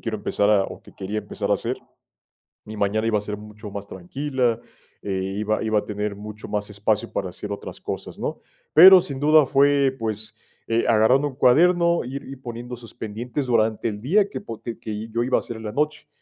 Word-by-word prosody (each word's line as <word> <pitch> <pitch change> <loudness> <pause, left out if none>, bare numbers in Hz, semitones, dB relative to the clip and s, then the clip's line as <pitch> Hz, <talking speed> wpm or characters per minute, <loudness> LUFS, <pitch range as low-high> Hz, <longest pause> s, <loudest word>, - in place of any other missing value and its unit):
quiero 115 -2 -3
empezar 100 0 0
a 100 -2 +4
o - - -8
que - - -16
quería 100 +3 -4
empezar 105 -1 -4
a - - +5
hacer, - - -2 0.9
mi 110 +1 -8
mañana 105 +2 0
iba 110 -2 +2
a - - -2
ser 105 0 -5
mucho 105 0 -10
más 100 0 -6
tranquila, 120 +5 -2 0.4
eh, 95 -2 -2 0.2
iba 110 0 0
iba 110 -1 +2
a - - -2
tener 105 0 -3
mucho 105 +1 -9
más 105 0 -2
espacio 105 +1 -1
para - - -2
hacer - - -7
otras - - -7
cosas, - - -6
¿no? - - -4 0.3
Pero 185 +4 +10
sin 140 -6 -6
duda 155 0 +6
fue, 140 0 +3
pues, 110 -1 -4 0.3
eh, 115 0 +1
agarrando 120 +6 +4
un 135 - -10
cuaderno, 170 +6 +4
ir 135 +3 -6
ir 135 -1 -9
poniendo 120 0 -6
esos 115 -1 -12
pendientes 120 +6 -4
durante 115 -2 +1
el 105 -2 -5
día 195 +9 +3
que, - - -6
po 115 - -8
que 110 -2 -5
yo 115 +1 -1
iba 130 +2 +2
a - - -1
hacer 120 - -7
en 110 - -9
la 105 - -4
noche, 150 +3 -1
115 Hz, 210 wpm, -23 LUFS, 105-135 Hz, 0.9 s, Pero